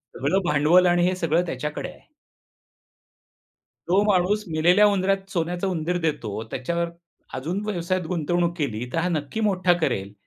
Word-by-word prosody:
सगळं 145 +10 +1
भांडवल 150 +5 +4
आणि 175 0 +3
हे 185 - 0
सगळं 170 0 +1
त्याच्याकडे 150 +1 -4
आहे." - - -20 1.8
तो 185 +4 +3
माणूस 205 +1 +2
मेलेल्या 175 +5 +4
उंदरात 195 -1 0
सोन्याचा 175 +2 -1
उंदीर 175 -1 -1
देतो, 110 -9 -2
त्याच्यावर 170 +6 -2 0.4
अजून 165 +10 -3
व्यवसायात 185 -2 -1
गुंतवणूक 170 +1 0
केली, 125 -7 -2
तर - - -1
हा 170 +2 +1
नक्की 155 +4 -3
मोठा 185 -2 +2
करेल, 100 -9 -1
175 Hz, 140 wpm, -24 LUFS, 155-185 Hz, 1.8 s, भांडवल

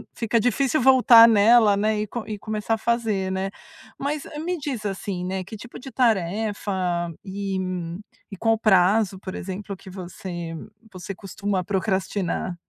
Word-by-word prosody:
fica 230 0 +1
difícil 260 +5 +1
voltar 250 -3 +8
nela, 220 -1 +5
né, 215 +1 +1
e 210 - -3
com 235 +2 -6
e 215 -1 -4
começar 215 +1 -2
a - - +1
fazer, 220 -5 0
né. 190 +1 -2 0.5
Mas 285 +1 -2 0.2
me 355 +1 -2
diz, 275 -7 -4
assim, 195 -2 -3
né 185 +1 -3
que 195 +4 -9
tipo 235 +3 -10
de 265 +2 -10
tarefa 210 -3 0 0.5
e 195 -1 -3 0.7
e 200 - -7
qual 225 +3 +2
o - - -6
prazo, 195 -1 +3
por 185 -1 -7
exemplo, 195 +2 -6
que 190 - -13
você 175 -2 -7 0.4
você 185 +1 -7
costuma 195 0 -3
procrastinar? 190 -2 -1
205 Hz, 155 wpm, -24 LUFS, 190-230 Hz, 0.7 s, voltar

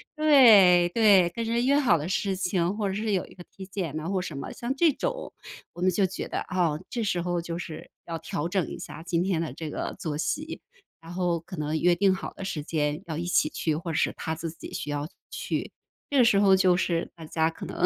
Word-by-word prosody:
对 220 - +7
对， 200 -4 +5
跟 230 +6 -4
人 235 +1 0
约 280 +1 +4
好 250 -12 +4
的 155 - -4
事 195 0 0
情， 180 0 0
或 210 -1 -1
者 190 - -3
是 215 +1 -1
有 190 -3 +1
一 - - -16
个 175 - -11
体 190 -1 -9
检 180 -6 -4
啊， 160 - -5
或 195 -1 0
者 - - -3
什 155 - -6
么。 140 - -6
像 245 +3 -4
这 330 +2 +4
种， - - -4 0.4
我 175 - -9
们 185 - +4
就 190 +2 +2
觉 190 - -5
得， - - -3
啊， 180 -3 +1 0.2
这 235 -2 -2
时 180 -4 0
候 175 0 -1
就 170 0 -5
是 160 -3 -8 0.2
要 165 -1 -3
调 155 +1 -4
整 185 -1 0
一 - - -7
下 160 - -8
今 170 -1 0
天 185 -4 0
的 165 -1 -3
这 160 -2 -6
个 - - -4
作 150 -3 -3
息， 305 - -3 0.4
然 165 +1 -10
后 175 -2 0
可 180 +3 -9
能 155 0 -2
约 175 0 +4
定 190 +2 +3
好 - - -7
的 - - -8
时 160 -6 -4
间 150 +1 -1
要 160 -2 -5
一 170 - -3
起 175 - +3
去， 155 0 -1
或 165 +2 -4
者 155 - -3
是 - - +2
他 160 - -3
自 160 +1 -4
己 160 - -10
需 - - -4
要 145 0 -2 0.2
去。 - - -3 0.4
这 285 - 0
个 250 - +7
时 220 -4 +4
候 195 -1 +6
就 185 -1 +4
是 170 -2 -1
大 165 - -9
家 160 +1 +1
可 165 - -8
能 - - -1
180 Hz, 270 characters per minute, -27 LUFS, 165-200 Hz, 0.4 s, 对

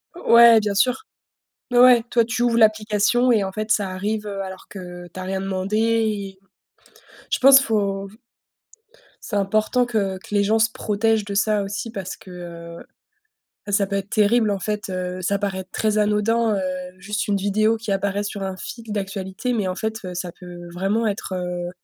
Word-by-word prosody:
O 350 - 0
ouais, 235 -1 +9
bien 205 -1 -1
sûr. 250 - +1 0.7
Mais 245 - +2
ouais, 245 -1 +7
toi, 235 -2 +3
tu 235 +1 -2
ouvres 235 -1 +2
l'application 215 +2 +3
et 210 -3 +2
en 190 - -4
fait, 215 +2 -4
ça 205 -3 +2
arrive, 210 +3 -3
heu, 195 -1 -4
alors 190 0 -9
que 180 -2 -9
tu 185 +2 -9
as - - -5
rien 190 +1 -3
demandé 195 +2 -2
et 215 -4 0 0.9
je - - 0
pense, 270 +1 +8
faut 200 -5 -1 1.2
c'est 205 - -3
important 215 +5 +1
que 200 -5 -1
que 200 - -12
les 205 -1 +3
gens 220 +2 +2
se 225 +1 +2
protègent 220 0 0
de 200 - -5
ça 210 0 +1
aussi 205 +3 -5
parce 190 -3 -6
que, 185 - -14
heu, 170 -1 -9 0.9
bah, - - -4
ça 200 0 +3
peut 200 0 -2
être 195 +1 -5
terrible, 215 +1 +3
en 200 - 0
fait, 210 +2 -3
heu. 185 0 -4
Ça 200 +3 0
paraît 195 -2 -3
très 215 -1 0
anodin, 210 +2 +2
heu, 195 - -1 0.4
juste 205 +2 -3
une 205 - +1
vidéo 215 +3 +1
qui 220 -2 -5
apparaît 200 +1 -1
sur 205 -1 -5
un 190 -1 -4
fil 230 - -8
d'actualité, 195 +3 -3
mais 210 -5 -1
en 185 - -2
fait, 220 +2 -3
heu, 180 -1 -6
ça 180 -1 -4
peut 175 -1 -10
vraiment 195 +5 0
être, 200 -3 -3
heu 180 -1 -4
205 Hz, 195 wpm, -22 LUFS, 190-220 Hz, 1.2 s, ouais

